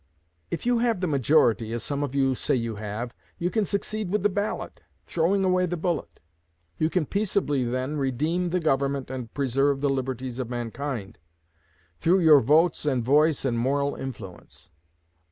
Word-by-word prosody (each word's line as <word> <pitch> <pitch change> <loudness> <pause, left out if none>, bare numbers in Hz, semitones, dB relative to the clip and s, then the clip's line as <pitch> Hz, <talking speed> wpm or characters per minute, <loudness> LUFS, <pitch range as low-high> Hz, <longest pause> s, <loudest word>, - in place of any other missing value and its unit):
If 170 - -4
you 245 -1 +3
have 230 -4 +1
the 185 - 0
majority, 130 -6 +2
as 120 -2 -3
some 140 0 -2
of 140 -2 -3
you 135 -1 +3
say 130 - 0
you 115 -3 -2
have, 110 +3 -5 0.2
you 175 +1 -1
can 220 -2 +1
succeed 210 0 -2
with 205 0 0
the 205 - +4
ballot, 205 +2 -3 0.2
throwing 180 +4 +1
away 185 0 +2
the 175 - -3
bullet. 160 - -3 0.6
You 155 - +2
can 175 -2 0
peaceably, 190 -8 0
then, 130 +5 -2
redeem 155 +7 0
the 180 +2 0
Government 140 -4 0
and 125 -3 -6
preserve 135 +1 +1
the 140 0 +1
liberties 130 -1 -3
of 125 -3 -3
mankind, 120 -2 -5 0.8
through 180 +3 +3
your 155 -3 +8
votes 155 +7 +3
and 130 -5 0
voice 150 +3 +3
and 120 -3 0
moral 140 +3 +1
influence. 95 -9 -9
140 Hz, 170 wpm, -26 LUFS, 125-175 Hz, 0.8 s, your